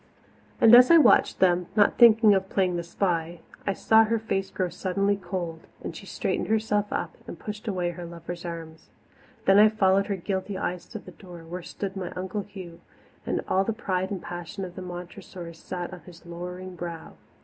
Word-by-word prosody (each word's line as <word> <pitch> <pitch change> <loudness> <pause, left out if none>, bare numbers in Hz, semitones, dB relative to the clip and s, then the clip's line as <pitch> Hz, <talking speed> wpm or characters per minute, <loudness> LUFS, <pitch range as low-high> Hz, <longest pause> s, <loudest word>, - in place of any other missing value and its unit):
And 225 - +7
as 250 +1 +9
I 335 - +8
watched 290 -8 +5
them 180 -1 +3
not 205 -2 +3
thinking 225 -3 +7
of 190 0 0
playing 185 -2 +1
the 170 - -1
spy 170 -1 -2 0.3
I 200 - +2
saw 220 +3 +5
her 230 +1 +1
face 195 -3 -2
grow 185 -2 -2
suddenly 195 +3 0
cold, 175 -4 -5 0.2
and - - -5
she - - -10
straightened - - -2
herself 210 -2 0
up 165 - -3
and - - -7
pushed 210 +5 -7
away 180 -4 -1
her 175 0 -8
lover's 170 +1 -8
arms. 165 -2 -8 0.6
Then 195 +1 +6
I 215 +1 +8
followed 195 -2 +2
her 200 - -1
guilty 190 +1 -3
eyes 180 0 -4
to 220 - -7
the - - -11
door, 175 -4 -12
where 175 +2 -7
stood 195 +2 -6
my 185 -2 -4
Uncle 185 +3 -3
Hugh, 185 -5 -11 0.5
and - - -1
all 190 - +2
the 225 - -1
pride 190 -4 -2
and 195 -3 -5
passion 175 +3 -6
of 180 - -9
the 185 - -7
Montressors 175 -1 -9
sat 180 0 -6
on 180 - -8
his 175 -1 -15
lowering 180 +2 -7
brow. 170 -1 -7
185 Hz, 195 wpm, -26 LUFS, 175-205 Hz, 0.6 s, as